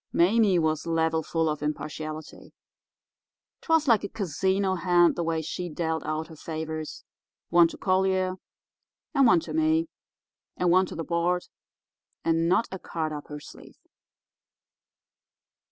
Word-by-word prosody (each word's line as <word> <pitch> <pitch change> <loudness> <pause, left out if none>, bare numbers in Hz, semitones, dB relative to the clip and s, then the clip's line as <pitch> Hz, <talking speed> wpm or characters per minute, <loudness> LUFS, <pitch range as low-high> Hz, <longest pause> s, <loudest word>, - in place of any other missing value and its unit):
Mame 195 +1 +4
was 155 +1 0
level 160 -1 +1
full 165 0 -1
of 150 -1 -2
impartiality. 155 +1 -5 1.1
'Twas 325 -2 +2
like 225 -5 +4
a 200 - -4
casino 190 +1 0
hand 175 -1 +3
the 175 - -2
way 165 -1 -1
she 175 +3 -4
dealt 160 0 -2
out 155 +1 -2
her 165 - -12
favours—one 160 +2 -2
to - - -10
Collier 185 -1 +1 0.8
and 275 -3 +5
one 180 -7 +5
to - - -7
me 320 +1 +2 0.7
and 180 -1 +2
one 185 +1 +4
to - - -8
the 165 - -3
board, 175 +2 0 0.8
and 165 0 +2
not 220 +6 +3
a 190 - -5
card 160 -3 -3
up 145 -1 -7
her 150 0 -7
sleeve. - - -14
170 Hz, 135 wpm, -27 LUFS, 160-190 Hz, 1.1 s, and